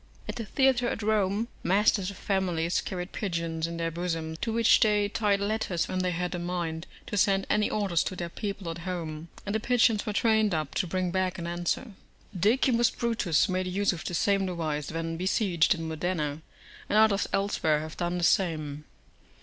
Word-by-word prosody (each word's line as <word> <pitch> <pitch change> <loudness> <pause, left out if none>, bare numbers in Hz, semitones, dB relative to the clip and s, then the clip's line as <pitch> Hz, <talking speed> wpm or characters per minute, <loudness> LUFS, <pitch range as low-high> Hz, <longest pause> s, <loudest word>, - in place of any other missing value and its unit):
At 210 +2 -4
the 230 - -4
theatre 255 +1 +2
at 225 - -4
Rome 210 +1 +1
masters 195 0 +2
of 200 - -9
families 180 -4 0
carried 180 0 -5
pigeons 165 -4 -2
in 170 0 -5
their 165 0 -1
bosoms 165 -2 -3
to 230 - -1
which 230 +1 +5
they 210 -3 +3
tied 205 -2 +1
letters 200 -4 -1
when 185 - -2
they 185 0 +1
had 180 +1 -2
a 175 - -3
mind 170 -2 -3 0.2
to 205 - -4
send 195 0 +3
any 210 0 +2
orders 195 -6 +1
to 185 - -3
their 175 -1 -4
people 195 -1 -5
at 165 - -7
home; 165 -3 -5 0.2
and 200 - -2
the 220 - +1
pigeons 225 -2 +2
were 210 - -1
trained 220 -3 +3
up 155 -3 -3
to 185 - 0
bring 185 +1 -1
back 185 0 0
an 170 - -5
answer. 175 +7 -2 0.4
D. 205 +6 +4 0.4
Brutus 225 -9 +2
made 185 0 -1
use 195 +2 +1
of 165 - -7
the 175 - -3
same 195 +1 +2
device 155 -5 -3
when 165 0 -3
besieged 185 -1 +2
in 165 -1 -5
Modena, 160 -2 -2 0.5
and 210 - +2
others 215 -2 +4
elsewhere 160 -6 +1
have 155 0 -7
done 175 0 -2
the 175 - -2
same. 155 -5 +1
185 Hz, 190 wpm, -28 LUFS, 165-205 Hz, 0.5 s, which